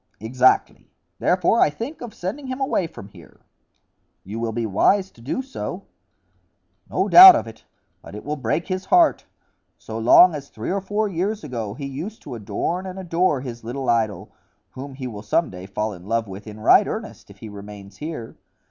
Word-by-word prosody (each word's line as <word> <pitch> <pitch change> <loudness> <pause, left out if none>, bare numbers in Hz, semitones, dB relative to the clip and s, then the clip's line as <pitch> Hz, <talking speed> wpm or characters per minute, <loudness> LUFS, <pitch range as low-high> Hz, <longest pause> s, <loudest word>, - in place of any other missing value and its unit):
"Exactly; 125 +3 +1 0.3
therefore 180 +5 +2
I - - +5
think 230 - -7
of 240 -2 -7
sending 260 +11 -5
him 260 +1 -5
away 265 - 0
from 105 - -12
here." 90 -5 -17 0.8
"You 105 +4 -6
will 115 -1 -2
be 115 +1 -2
wise 190 - +2
to 115 - -19
do 140 - -3
so." 265 - -6 1.1
"No - - 0
doubt 370 0 +11
of - - -1
it; 110 0 -13 0.4
but - - -11
it 105 - -8
will 150 +1 -2
break 135 +4 -2
his 185 -1 -3
heart. 345 - +3 0.5
So 110 0 -7
long 160 +10 +7
as 140 -2 -7
three 110 +9 -5
or 195 +1 -1
four 205 +3 -1
years 200 +3 -2
ago 115 -6 -5
he 140 - -6
used 160 +11 -7
to - - -8
adorn 170 - -3
and 185 0 -7
adore 175 -5 0
his 120 -3 -8
little 125 +3 -2
idol, 110 -3 -1 0.4
whom 135 +1 -9
he 130 -1 -7
will 110 -5 -6
some 110 +10 0
day 90 0 -9
fall 105 +2 -3
in 90 0 -13
love 115 0 -1
with 100 +3 -10
in 105 0 -9
right 110 - +5
earnest - - -7
if - - -15
he 110 - -10
remains 100 -1 -11
here. 150 -7 -7
130 Hz, 190 wpm, -22 LUFS, -, 1.1 s, doubt